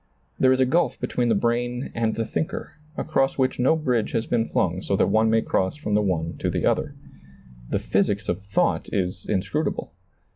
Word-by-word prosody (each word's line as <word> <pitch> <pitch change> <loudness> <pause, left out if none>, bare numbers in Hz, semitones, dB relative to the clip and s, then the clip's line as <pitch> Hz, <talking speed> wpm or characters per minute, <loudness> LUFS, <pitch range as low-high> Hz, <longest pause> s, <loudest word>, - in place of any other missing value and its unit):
There 130 - +5
is 130 - +3
a 130 - +5
gulf 165 +7 +1
between 120 -1 0
the 115 - +3
brain 120 +3 -1
and 115 -1 0
the 115 - -1
thinker, 155 +8 -3 0.3
across 135 -4 0
which 130 -1 +1
no 130 +6 +4
bridge 125 -8 0
has 115 - 0
been 115 -2 +1
flung 90 +1 0
so 100 - 0
that - - +2
one 110 +1 +3
may 110 0 +3
cross 95 +6 0
from 150 -8 -4
the 105 - +4
one 85 -5 -1
to - - 0
the - - -1
other. - - 0 0.7
The - - +1
physics 100 +1 0
of 90 +3 -1
thought 100 +1 0
is 90 -1 -2
inscrutable. 105 +10 -1
115 Hz, 195 wpm, -24 LUFS, 100-130 Hz, 0.7 s, There